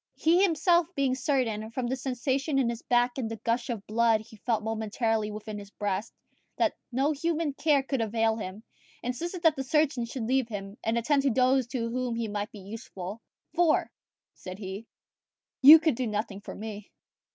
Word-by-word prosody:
He 340 +3 +3
himself 340 -2 +3
being 275 -2 +1
certain, 250 -5 -1
from 245 +2 -3
the 250 +2 -1
sensation 270 +3 -1
in 250 -3 +2
his 235 - -6
back 245 +1 +1
and 230 -4 -2
the 225 - -4
gush 235 +3 -1
of 225 -5 -4
blood 225 0 +3
he 220 +1 -15
felt 220 0 -1
momently 220 0 -1
within 210 0 -6
his 200 -1 -11
breast, 205 0 -3 0.5
that - - +2 0.2
no 270 +5 +1
human 315 0 -1
care 285 -1 +2
could 270 -2 -1
avail 225 0 +1
him, 205 0 -6 0.4
insisted 340 +9 -4
that 320 -2 +5
the 270 - -3
surgeon 280 -3 +1
should 235 +1 -5
leave 260 0 +1
him 200 -2 -6
and 225 +1 0
attend 275 +5 +2
to 275 - +2
those 255 +1 +3
to 235 -2 -3
whom 250 -1 -2
he 230 -1 -2
might 205 0 -4
be 205 - -11
useful; 200 0 -8 0.3
"for," 335 -2 +2 0.4
said 185 0 -9
he, 200 +2 -7 0.7
"you 295 +4 +12
can 320 -2 +1
do 245 +1 -2
nothing 210 -1 -3
for - - -8
me." 210 -1 -7
235 Hz, 185 wpm, -28 LUFS, 215-270 Hz, 0.7 s, you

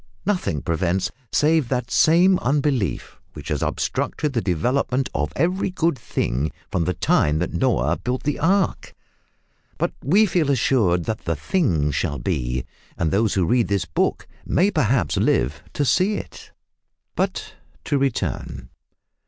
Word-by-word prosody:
Nothing 180 - -1
prevents, 90 +2 0 0.2
save 155 -4 +2
that 125 -2 -2
same 180 +4 +5
unbelief 135 - -1
which - - -9
has - - -1
obstructed 150 -3 -2
the 115 - 0
development 125 - 0
of 75 +2 -1
every 180 +6 0
good 170 -3 0
thing 75 - -2 0.2
from 85 -3 0
the 90 0 -1
time 75 0 +2
that 90 - -2
Noah 130 -2 +1
built 125 +1 -2
the 150 - -1
ark! 190 +2 0 0.8
But - - -1
we 195 - +4
feel 170 -6 +1
assured 115 -10 +2
that 110 -1 -4
the 80 - 0
thing 80 - 0
shall 70 +1 -1
be, 60 0 -2 0.3
and 80 -2 0
those 110 +4 +1
who 95 -3 +2
read 120 +5 +2
this 100 -3 0
book - - -1 0.2
may 195 +4 +2
perhaps 135 - +1
live 70 +4 +1
to 145 - 0
see 185 - +2
it! - - -8 0.6
But - - -2 0.3
to 145 -3 0
return. 135 -3 -2
125 Hz, 145 wpm, -22 LUFS, -, 0.8 s, same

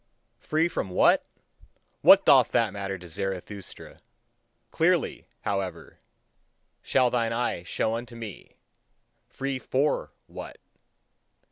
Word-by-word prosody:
Free 155 +4 +1
from 95 - -3
what? 90 - +3 0.7
What - - +8
doth - - +6
that - - +2
matter 95 -1 -4
to 90 0 -12
Zarathustra! 95 +2 -6 0.7
Clearly, - - +1
however, 100 -2 -4 0.8
shall 130 -2 +2
thine 115 -2 0
eye 120 -6 -1
show 110 +5 -1
unto 120 +1 -5
me: 110 -5 -9 0.7
free 135 -1 -3
FOR 135 +4 0
WHAT? - - -9
110 Hz, 105 wpm, -27 LUFS, 95-125 Hz, 0.8 s, What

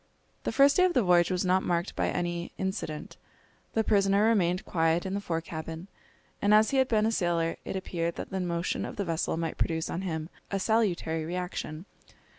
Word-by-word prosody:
The - - 0
first 280 +3 +5
day 365 - +6
of 360 - +1
the 250 - +4
voyage 175 -2 +4
was 185 0 0
not 185 +1 +3
marked 175 +1 -1
by - - 0
any 175 -1 -2
incident. 165 -5 -4 0.6
The 220 - +2
prisoner 200 0 +3
remained 185 -5 +2
quiet 165 0 +1
in 190 - -3
the 200 - -1
fore 165 -4 -2
cabin, 165 +2 -7 0.5
and 205 +1 +5
as 215 0 +5
he 275 - +1
had 260 -1 +4
been 215 -3 +2
a 225 - +2
sailor 170 -5 0
it - - -4
appeared 170 -3 -2
that - - -6
the 190 - -2
motion 170 -1 -1
of - - -5
the 200 - -2
vessel 165 -1 -1
might 165 -1 -3
produce 160 -1 -1
on 170 - -2
him 160 -4 -3 0.2
a 200 - -1
salutary 185 -7 +1
reaction. 175 -1 -4
180 Hz, 205 wpm, -29 LUFS, 165-205 Hz, 0.6 s, day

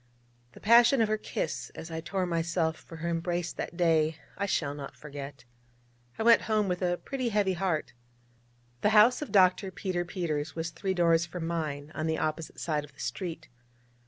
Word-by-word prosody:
The - - -13
passion 235 +4 +6
of 225 -2 +3
her 215 - +1
kiss 160 - -3
as 160 - -8
I 160 0 -3
tore 185 +2 -1
myself 170 -1 0
from 165 - -12
her 165 +1 -4
embrace 170 +1 -1
that 170 - -6
day 160 -3 +3 0.2
I 200 +1 -2
shall 145 -7 0
not 145 -1 -8
forget. 140 -3 -8 0.7
I - - -1
went 230 0 +7
home 215 -2 +2
with 180 0 -2
a 175 -1 +1
pretty 260 +1 -3
heavy 205 -3 +2
heart. 170 -8 -1 0.9
The 210 - +4
house 235 +6 +6
of 300 - -5
Dr. 190 0 +4
Peter 185 -1 -2
Peters 160 -4 -3
was 165 0 -3
three 190 +4 -2
doors 170 -1 +3
from 165 0 -5
mine, 155 -3 -3
on 155 0 -2
the 160 0 0
opposite 155 +1 -3
side 150 -3 -1
of 145 -1 -13
the - - -23
street. 160 +6 -4
170 Hz, 190 wpm, -29 LUFS, 160-190 Hz, 0.9 s, went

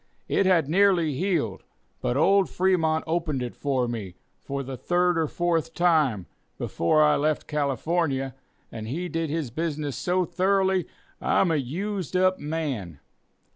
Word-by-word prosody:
It 195 - +2
had 170 -6 +3
nearly 175 -2 +3
healed; 150 - -1 0.4
but 120 - 0
old 195 +5 +4
Fremont 165 -4 +1
opened 160 -5 -1
it 120 - -6
for 130 -4 0
me, 105 -7 -5 0.2
for 140 0 -4
the 135 0 -6
third 180 +6 +1
or 165 -1 +1
fourth 165 0 -1
time, 155 - +2 0.3
before 155 - +2
I 150 0 +4
left 150 +1 0
California, 140 -1 -1 0.4
and 110 -1 -6
he 170 +9 -3
did 165 -2 -2
his 150 -5 -2
business 150 -1 -3
so 180 0 0
thoroughly, 190 0 +1 0.3
I'm 180 - +2
a 160 - +2
used 185 +7 -3
up 185 0 +3
man. 140 - -4
160 Hz, 145 wpm, -26 LUFS, 135-180 Hz, 0.4 s, old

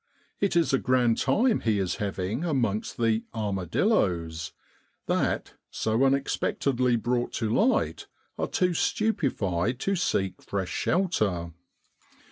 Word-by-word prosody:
It 200 -3 +1
is 170 -4 +3
a 135 - +4
grand 125 -2 +2
time 220 - +2
he 110 -3 +1
is 95 -2 -1
having 100 - -2
amongst 120 - -1
the 115 -1 +1
' - - -40
armadilloes' 90 - 0 0.5
that, - - -1 0.2
so 110 +4 0
unexpected 135 -1 0
ly 125 -1 +3
brought 120 +1 -1
to 110 -1 -1
light, 245 - +1 0.3
are - - -2
too 180 -1 +1
stupe 195 - +1
fied 95 +5 -1
to 195 - +1
seek 95 - -1
fresh 95 -2 -3
shelter. 105 - 0
115 Hz, 130 wpm, -27 LUFS, 100-145 Hz, 0.5 s, a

